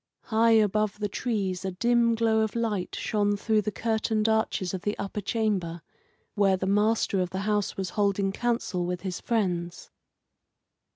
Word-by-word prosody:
High 225 0 +3
above 215 -1 +2
the 210 0 -1
trees 200 -4 -2
a 190 - -1
dim 235 +4 +2
glow 225 -1 +2
of 220 0 0
light 215 -6 -2
shone 205 -1 0
through 215 +1 +1
the 210 - -3
curtained 220 0 0
arches 220 -4 0
of 185 - -3
the 205 +2 -2
upper 200 +1 -4
chamber, 195 -6 -1 0.5
where 195 -2 +3
the 190 - -3
master 205 0 +2
of 180 - -1
the 190 +1 -4
house 210 -1 -1
was 190 -2 -3
holding 200 -1 +1
council 210 -6 -1
with 180 0 -3
his 185 -3 -4
friends. 180 -6 -2
210 Hz, 165 wpm, -27 LUFS, 190-220 Hz, 0.5 s, High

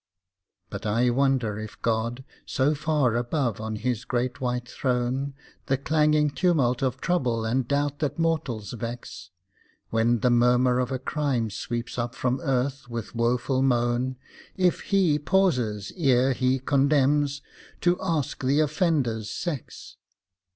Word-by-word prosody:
But - - -5
I 120 +4 +2
wonder 125 -5 +1
if 110 0 -8
God, 115 +3 -1 0.2
so 135 +3 +1
far 150 -5 +1
above 120 -2 -1
on 110 0 -3
His 120 +1 -2
great 125 0 -2
white 125 -1 -2
throne 130 +2 -1 0.3
The 135 -2 +2
clanging 150 +1 +2
tumult 140 -8 +1
of 130 -2 -1
trouble 125 -11 0
and 120 +2 0
doubt 145 +1 0
that 145 -2 -2
mortals 150 -10 -1
vex; 120 -5 -7 0.6
When 115 0 +2
the 125 - +3
murmur 125 +1 +4
of 125 0 -1
a 130 - 0
crime 130 -4 -1
sweeps 120 +4 -4
up 120 0 -3
from 130 +1 -1
earth 135 0 -1
with 115 -2 -5
woeful 120 +3 +1
moan, 125 0 +1 0.4
If 180 -2 +2
He 185 -7 +2
pauses, 125 - +1
ere 135 -6 +3
He 130 +1 +1
condemns, 140 +1 +2 0.4
to 175 0 +2
ask 160 -8 -2
the 135 +3 +2
offender's 145 - +1
sex. 155 -1 -6
130 Hz, 135 wpm, -26 LUFS, 120-145 Hz, 0.6 s, murmur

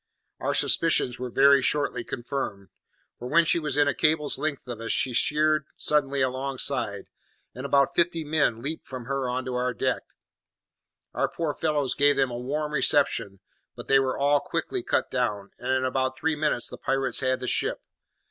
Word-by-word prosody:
"Our - - -1
suspicions 120 -1 +2
were 125 0 -4
very 140 +2 +5
shortly 130 -3 0
confirmed, 120 -7 -5 0.5
for 125 - -6
when 170 +3 +4
she 170 - +2
was 150 -2 -2
within 145 0 +3
a 145 - +2
cable's 155 -2 +1
length 150 -4 -3
of 120 -2 -6
us 115 - -2
she 130 - +1
sheered 155 +3 +2
suddenly 140 -2 +1
alongside, 130 -5 -2 0.5
and 130 +2 -6
about 140 -1 +3
fifty 170 -1 +1
men 145 -7 0
leaped 155 +3 -5
from 130 -2 -7
her 135 -1 -2
on 130 +1 -2
to 130 - -4
our 125 0 -1
deck. - - 0 1.1
Our - - 0
poor 160 -3 -3
fellows 150 -3 -1
gave 145 0 +4
them 135 -2 +1
a 120 - -4
warm 150 +4 -3
reception; 115 -9 +1 0.3
but - - -9
they 135 - +5
were 130 -1 -1
all 145 +1 +3
quickly 360 - -3
cut 390 +2 -1
down, 105 -6 -2
and 125 - -5
in 130 0 +1
about 130 0 -1
three 160 +2 0
minutes 150 -5 +1
the - - -7
pirates 135 -1 -1
had 130 -1 0
the 130 - -5
ship. - - 0
135 Hz, 185 wpm, -26 LUFS, 125-150 Hz, 1.1 s, very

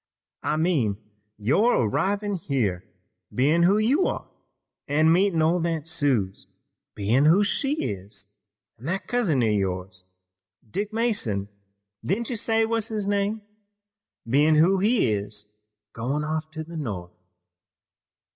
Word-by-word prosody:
"I 155 - -1
mean 150 - +1 0.4
your 150 - +3
arrivin' 200 - 0
here, 125 - -1 0.5
bein' 150 +7 +2
who 190 +4 +5
you 260 - +3
are, - - -4 0.6
an' 150 +2 +2
your 160 - +6
meetin' 180 -3 +3
old 170 +1 +2
Aunt 165 -2 -3
Suse, 125 -12 -1 0.5
bein' 115 +8 +2
who 175 +7 +5
she 275 +7 0
is, 100 0 -5 0.5
an' 120 - -12
that 185 +5 -2
cousin 195 - +1
of 110 -2 +2
yours, 95 -1 -3 0.6
Dick 205 - -3
Mason, 205 - -1 0.5
didn't 230 +6 -1
you - - -1
say 225 0 +1
was 225 -1 0
his 215 -3 -2
name, 205 +1 0 0.8
bein' 145 +6 +4
who 180 +5 +4
he 210 - +2
is, 105 +1 -5 0.5
goin' 135 +6 -2
off 155 +1 -3
to 160 0 -6
the 165 +1 -9
North." 95 - -5
155 Hz, 135 wpm, -25 LUFS, -, 0.8 s, your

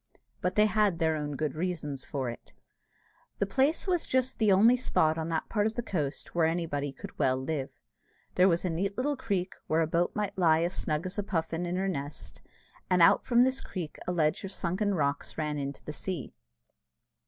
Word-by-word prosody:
But 180 +1 -1
they 210 - +6
had 210 -4 +2
their 160 -1 +1
own 145 -1 -3
good 155 -1 -2
reasons 155 -5 -3
for 130 -4 -3
it. 115 - -13 0.8
The - - +1
place 270 +10 +1
was 360 -3 0
just 260 -1 0
the 215 -3 +4
only 220 +6 +6
spot 160 -10 +2
on 160 0 -3
that 160 -1 -1
part 210 -1 +1
of 220 - -4
the 240 - -2
coast 150 -10 -3
where 165 -2 +3
anybody 160 -4 -1
could - - -11
well 130 0 +3
live. 135 0 -3 0.6
There 185 - +5
was 170 +1 +1
a 180 - 0
neat 195 +5 -2
little 290 +3 0
creek, 200 -8 -2
where 160 +1 +2
a - - +3
boat 170 +2 0
might 210 -2 -2
lie 165 -3 +4
as 175 +2 -1
snug 155 +2 -2
as 185 +3 -3
a - - 0
puffin 165 -2 -2
in 175 - -2
her 190 +1 0
nest, 140 - -5 0.5
and 180 - +3
out - - +5
from 240 -1 +5
this 260 +1 +1
creek 170 -6 -6
a - - +1
ledge 155 -3 +1
of 195 - -5
sunken 195 +2 -1
rocks 140 -3 -1
ran 150 -2 -1
into 140 0 -5
the 150 - -5
sea. 175 -5 -5
175 Hz, 210 wpm, -29 LUFS, 155-200 Hz, 0.8 s, they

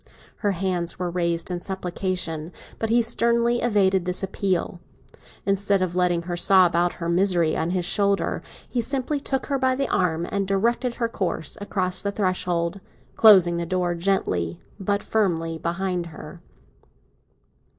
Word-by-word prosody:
Her 205 -2 0
hands 175 -2 -2
were 180 -1 -3
raised 170 0 -1
in 175 -1 -3
supplication, 180 -3 -3 0.3
but 225 - -1
he 235 +1 +4
sternly 235 +1 +1
evaded 195 -5 +2
this 180 +1 -1
appeal. 190 -2 -1 0.7
Instead 200 -1 +2
of 180 -1 -3
letting 175 -2 +1
her 175 0 -4
sob 180 -1 +4
out 175 +1 +2
her 170 - -5
misery 175 -2 +2
on 160 +1 -1
his 180 -1 -1
shoulder, 200 +1 +1 0.3
he 245 - -1
simply 275 +4 -1
took 270 -1 -2
her 275 -2 -1
by 260 -1 +2
the 275 0 -1
arm 170 -2 0
and 200 -1 -1
directed 235 +5 0
her 235 - -1
course 190 -7 -3
across 185 -3 0
the 200 - -2
threshold, 185 -2 -1 0.4
closing 185 -6 +6
the 170 - -2
door 180 -1 0
gently 130 - -1 0.2
but 200 +1 -1
firmly 165 -6 0
behind 175 +1 -2
her. 160 +1 -11
185 Hz, 150 wpm, -24 LUFS, 175-205 Hz, 0.7 s, closing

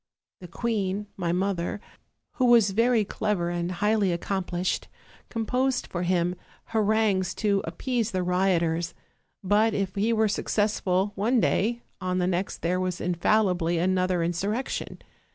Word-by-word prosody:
The 180 - -10
queen, 205 0 -2
my 175 -3 -1
mother, 185 +1 -1 0.6
who 255 - +3
was 235 -5 +5
very 230 +1 +3
clever 195 -4 -1
and 175 0 -2
highly 210 0 +2
accomplished, 180 0 -2 0.4
composed 250 +3 0
for 175 - -4
him 175 -1 +1 0.3
ha 225 - -1
rangues 210 -3 +2
to 200 -2 +1
appease 245 -4 -2
the 185 -4 -1
rioters; 175 -2 +1 0.5
but 210 +3 +3
if 195 -2 -1
he 210 +3 +1
were 220 -1 +3
successful 205 -2 0
one 225 +6 +1
day, 235 +3 +1 0.2
on 185 0 -1
the 180 - +1
next 185 +1 -2
there 180 +2 +1
was 185 -1 -2
infallibly 175 -1 +1
another 185 0 +1
insur 175 +4 -1
rection. 265 - -5
190 Hz, 140 wpm, -26 LUFS, 180-215 Hz, 0.6 s, was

